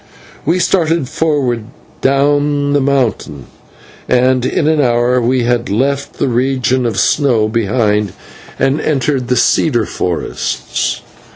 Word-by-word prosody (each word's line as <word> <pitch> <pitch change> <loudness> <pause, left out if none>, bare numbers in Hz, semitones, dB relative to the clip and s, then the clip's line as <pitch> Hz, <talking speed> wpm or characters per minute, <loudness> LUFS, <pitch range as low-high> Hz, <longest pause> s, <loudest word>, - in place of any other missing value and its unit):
We 170 +3 +2
started 165 -5 +1
forward 145 -7 -1 0.4
down 145 +1 +1
the 145 - +2
mountain, 125 - -1 0.6
and 125 0 +2
in 150 - 0
an 155 -1 +2
hour 120 0 +2
we 125 +1 +1
had 120 0 0
left 135 +7 -1
the - - -2
region 130 0 0
of 110 -4 -3
snow 125 -7 +2
behind, 105 -2 0 0.4
and 135 +3 +1
entered 135 -3 -1
the 125 - +1
cedar 120 -5 +2
forests. 90 -2 -3
130 Hz, 120 wpm, -14 LUFS, 120-145 Hz, 0.6 s, We